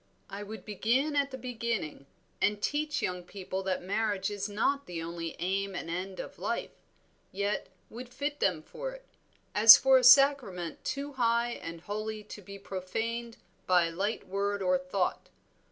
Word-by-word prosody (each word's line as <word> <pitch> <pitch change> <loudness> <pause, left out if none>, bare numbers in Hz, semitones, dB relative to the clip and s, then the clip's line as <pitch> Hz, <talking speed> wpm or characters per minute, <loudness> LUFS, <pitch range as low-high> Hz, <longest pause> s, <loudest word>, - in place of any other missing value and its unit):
"I 200 +1 -6
would 210 +1 -8
begin 240 +8 0
at 280 -1 +2
the 260 - -7
beginning, 230 - -4 0.3
and 210 0 +2
teach 295 +6 -1
young 180 -1 -2
people 190 +1 -5
that 190 -1 -2
marriage 200 0 -1
is 205 0 -3
not 275 +7 0
the 175 -2 -5
only 165 0 -5
aim 195 +2 -1
and 165 - -5
end 185 +2 -4
of - - -8
life, - - -2 0.6
yet 200 +1 -2 0.2
would 240 +2 -9
fit 285 +3 -4
them 170 -5 +1
for - - -6
it, - - -13 0.5
as 220 +1 +11
for 265 -1 +5
a - - -3
sacrament 250 - +5
too 280 +2 -3
high 235 -1 +1
and 165 -7 -7
holy 215 +2 -4
to 205 0 -10
be 200 +1 -10
profaned 225 +5 -4 0.3
by 180 -2 +5
a 165 - -3
light 205 +5 -2
word 200 +1 -1
or 180 0 +3
thought. 180 +1 -2
205 Hz, 170 wpm, -30 LUFS, 185-240 Hz, 0.6 s, as